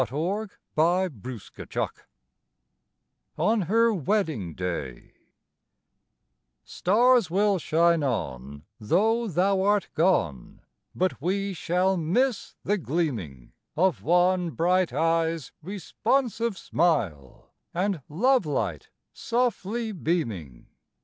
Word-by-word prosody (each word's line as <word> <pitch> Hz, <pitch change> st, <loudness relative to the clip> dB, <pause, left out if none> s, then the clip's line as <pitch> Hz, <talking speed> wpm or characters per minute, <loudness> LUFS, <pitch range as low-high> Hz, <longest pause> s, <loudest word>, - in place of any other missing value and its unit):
1882 160 Hz, -, -2 dB
TO -, -, -4 dB
WINNIE -, -, +1 dB, 1.5 s
ON 220 Hz, 0 st, +2 dB
HER 230 Hz, +3 st, +3 dB
WEDDING 155 Hz, -, -1 dB
DAY 85 Hz, -9 st, -5 dB, 1.5 s
Stars 235 Hz, +1 st, +3 dB
will 200 Hz, +2 st, +2 dB
shine 170 Hz, +1 st, +3 dB
on, 70 Hz, -, -3 dB, 0.2 s
tho 225 Hz, -, +2 dB
thou 190 Hz, +2 st, +2 dB
art 205 Hz, 0 st, +2 dB
gone, 90 Hz, -, 0 dB, 0.3 s
But 185 Hz, -6 st, -1 dB
we 195 Hz, +4 st, -1 dB
shall 180 Hz, +2 st, +1 dB
miss 215 Hz, +9 st, 0 dB
the 205 Hz, 0 st, 0 dB
gleaming 110 Hz, -, -3 dB, 0.3 s
Of 185 Hz, +1 st, +2 dB
one 180 Hz, +1 st, +2 dB
bright 180 Hz, +2 st, +1 dB
eye's 165 Hz, +1 st, 0 dB
responsive 225 Hz, -, -1 dB
smile, 105 Hz, -, -1 dB, 0.2 s
And 185 Hz, -2 st, -1 dB
love 240 Hz, -, +2 dB
light 100 Hz, -, -2 dB, 0.2 s
softly 235 Hz, -2 st, -1 dB
beaming. 115 Hz, -, -3 dB
175 Hz, 90 wpm, -26 LUFS, 135-200 Hz, 1.5 s, HER